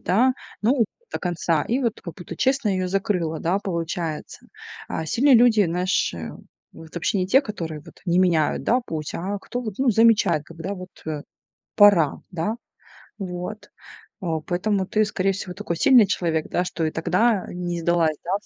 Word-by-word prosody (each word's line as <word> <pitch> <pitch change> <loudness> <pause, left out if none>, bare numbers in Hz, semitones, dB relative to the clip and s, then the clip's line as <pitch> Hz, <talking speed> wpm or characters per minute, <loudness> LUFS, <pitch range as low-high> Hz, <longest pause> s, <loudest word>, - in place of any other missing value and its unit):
да, 245 +8 +3 0.3
ну, 240 +2 +3 0.3
до - - -2
конца. 170 -3 0
И 250 +4 0
вот 235 -4 -1
как 170 -4 -8
будто 175 - -9
честно 265 -4 +1
ее 185 -2 0
закрыла, 180 -4 -1
да, 175 +4 +1
получается. 170 -4 -4 0.4
А 160 - -3
сильные 265 - +4
люди, 230 -3 +6
знаешь, 180 +3 0
э, 80 -3 -6 0.4
вот 160 -1 -13
вообще 175 +3 0
не 185 - 0
те, 260 +8 +5
которые 165 - -6
вот - - -15
не 175 +1 +2
меняют, 170 -5 +2
да, 250 +2 +2
путь, 155 -2 -4
а 195 +4 -3
кто 245 - -5
вот, 215 -5 -5
ну, 265 -1 +3
замечает, 210 -8 +4
когда 170 +5 -6
вот, 185 0 -9 0.2
э, 150 -2 -3 0.5
пора, 200 -8 +5
да. 185 +6 -2 0.6
Вот. 180 +2 -6 0.5
Э, - - -6 0.2
поэтому 190 +2 0
ты, 215 +2 +2
скорее 195 -1 0
всего, 185 -1 -6
такой 190 -3 -4
сильный 250 - +6
человек, 165 -5 -1
да, 175 - 0
что 165 -2 -2
и 155 - -1
тогда 185 +6 +1
не 175 -1 -4
сдалась, 165 -2 +2
да, 175 - -4
в - - -28
185 Hz, 180 wpm, -23 LUFS, 165-210 Hz, 0.6 s, люди